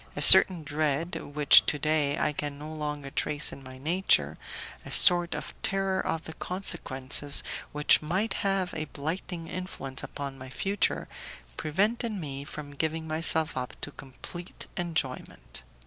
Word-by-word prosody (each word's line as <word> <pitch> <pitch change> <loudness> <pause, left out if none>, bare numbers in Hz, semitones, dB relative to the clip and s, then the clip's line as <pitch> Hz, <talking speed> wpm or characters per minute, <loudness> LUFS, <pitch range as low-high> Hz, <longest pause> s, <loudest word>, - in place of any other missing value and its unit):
A - - -4
certain 180 -4 +10
dread 155 +2 -2 0.2
which 150 -2 +7
to 150 - +2
day 150 -1 0
I 150 - 0
can 145 -1 -5
no 155 +2 -9
longer 150 -2 -6
trace 150 +1 -1
in - - -11
my 130 0 -12
nature, 170 +8 +1 0.4
a - - -10
sort 175 -1 +7
of - - -7
terror 195 -1 -1
of 165 0 -3
the 160 - -9
consequences 145 -6 -4 0.3
which 150 0 +3
might 185 +8 -1
have 195 -2 -1
a 155 -1 -4
blighting 165 +3 -6
influence 165 -8 -6
upon 140 -1 -7
my 130 0 -10
future, 195 +9 -2 0.5
prevented 215 - -1
me 140 -8 -6
from 145 0 -9
giving 160 +2 -3
myself 160 0 +2
up 125 -1 -6
to 145 - -3
complete 160 +7 -11
enjoyment. 160 -7 -4
155 Hz, 145 wpm, -27 LUFS, 145-175 Hz, 0.5 s, certain